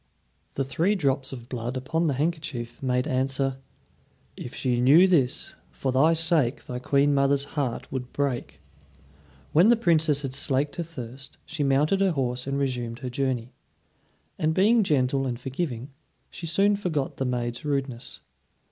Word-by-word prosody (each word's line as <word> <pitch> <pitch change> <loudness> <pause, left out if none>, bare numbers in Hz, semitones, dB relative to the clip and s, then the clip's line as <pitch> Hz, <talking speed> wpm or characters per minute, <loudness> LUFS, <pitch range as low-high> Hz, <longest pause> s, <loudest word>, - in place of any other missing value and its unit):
The 135 - 0
three 165 +9 +1
drops 135 -6 0
of 120 -3 -8
blood 125 +1 -4
upon 160 +6 -1
the 145 -4 +1
handkerchief 145 -6 -3
made 125 -1 0
answer: 135 +1 0 0.8
"If 125 - -8
she 125 -2 0
knew 155 +9 +7
this, 145 -9 +1
for 135 - -3
thy 145 +6 +4
sake 160 -5 +2
Thy 125 0 -5
queen 140 +3 +2
mother's 140 0 +3
heart 135 -6 -3
would 125 -1 -4
break." 140 -4 -3 0.9
When 175 +8 +6
the 240 - +7
Princess 160 -8 +2
had 135 -2 -3
slaked 140 +2 0
her 170 - -1
thirst, 135 -3 -9
she 160 -1 -5
mounted 145 +8 +2
her 190 -3 +3
horse 125 -2 -2
and 140 0 -1
resumed 125 -4 -2
her 125 - -3
journey, 125 -2 -2 0.9
and 155 +1 +1
being 220 +5 +5
gentle 135 -6 +1
and 120 -2 -3
forgiving, 135 -1 -4 0.4
she 165 - -6
soon 200 +5 +3
forgot 165 -9 -2
the 135 - -1
maid's 120 -1 -2
rudeness. 135 -4 -3
135 Hz, 155 wpm, -26 LUFS, 125-160 Hz, 0.9 s, knew